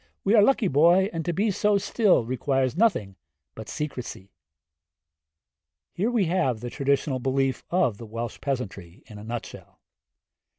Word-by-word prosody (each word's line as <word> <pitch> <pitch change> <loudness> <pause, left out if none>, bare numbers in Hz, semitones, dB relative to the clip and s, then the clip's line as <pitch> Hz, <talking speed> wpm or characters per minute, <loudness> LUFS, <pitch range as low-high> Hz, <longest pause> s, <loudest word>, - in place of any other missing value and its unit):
We 200 - +2
are 220 - +7
lucky, 220 -1 +3
boy, 175 +6 +4
and 165 -1 -3
to 175 - 0
be 205 +5 0
so 205 +2 +2
still, 200 - +2
requires 130 +1 0
nothing 165 - +1 0.4
but 110 -1 -9
secrecy.' 130 - -6 1.6
Here 210 +6 0
we 235 -6 +1
have 160 -9 0
the 120 +1 -6
traditional 140 -1 0
belief 135 0 -1
of 125 - +1
the 115 - -9
Welsh 115 +2 -6
peasantry 105 -7 -5
in 105 -3 -11
a - - -10
nut 115 +1 -5
shell. - - -13
135 Hz, 155 wpm, -25 LUFS, 115-185 Hz, 1.6 s, are